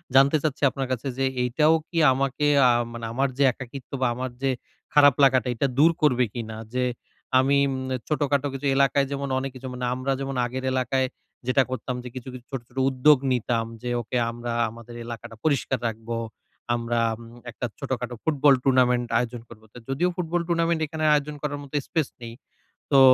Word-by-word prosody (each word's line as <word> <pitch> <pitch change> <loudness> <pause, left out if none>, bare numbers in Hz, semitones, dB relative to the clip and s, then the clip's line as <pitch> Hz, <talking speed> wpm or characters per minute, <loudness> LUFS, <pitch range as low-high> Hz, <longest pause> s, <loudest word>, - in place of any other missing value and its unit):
জানতে 135 +3 +6
চাচ্ছি 145 -2 -2
আপনার 135 0 -4
কাছে 130 +2 -2
যে, 135 - +1 0.2
এটাও 150 +6 +3 0.2
কি 170 - -5 0.2
আমাকে 135 +2 0 0.2
আ - - +6 0.2
মানে 115 -1 -6
আমার 135 +3 +1
যে 140 - +3
একাকিত্ব 125 +2 -10
বা 130 - +3
আমার 130 +1 -4
যে 135 - +1 0.4
খারাপ 145 -3 +7
লাগাটা 130 -3 +4
এটা 140 - +1
দূর 160 +4 +6
করবে 125 -5 +4
কিনা? 110 -2 -5 0.2
যে 125 0 +1 0.6
আমি 135 +2 +3
উম - - -2 0.3
ছোটখাটো 145 -2 +1
কিছু 135 +1 -5
এলাকায় 140 0 +3
যেমন 140 0 -2
অনেক 135 0 -4
কিছু 130 +1 -7
মানে 125 0 -3
আমরা 130 +2 -2
যেমন 135 0 -3
আগের 130 +2 -4
এলাকায় 130 +1 +1 0.4
যেটা 130 +1 +4
করতাম 130 0 -3
যে, 125 - -7
কিছু, 130 0 -7
কিছু 125 -1 -10
ছোট, 135 -3 -3
ছোট 125 - -22
উদ্যোগ 135 +3 +5
নিতাম 120 -2 0 0.2
যে 125 - -4
ওকে 120 +2 -3
আমরা 120 0 -5 0.2
আমাদের 115 +1 -11
এলাকাটা 115 -1 -8
পরিষ্কার 140 -4 +1
রাখবো। 115 +1 -4 0.6
আমরা 120 0 -1 0.2
উম - - -12 0.3
একটা 120 - -5
ছোটখাটো 125 -3 -3
ফুটবল 145 -2 +4
টুর্নামেন্ট 125 -2 +3
আয়োজন 120 -1 -3
করব। 110 -2 -13
তো - - -12
যদিও 150 +7 +1
ফুটবল 175 -1 -1
টুর্নামেন্ট 170 -1 +1
এখানে 155 +1 -4
আয়োজন 150 0 0
করার 145 -1 -3
মত 140 - -14
স্পেস 160 -5 0
নেই। 115 -1 -7 0.6
তো 135 - +7
130 Hz, 185 wpm, -25 LUFS, 125-140 Hz, 0.6 s, খারাপ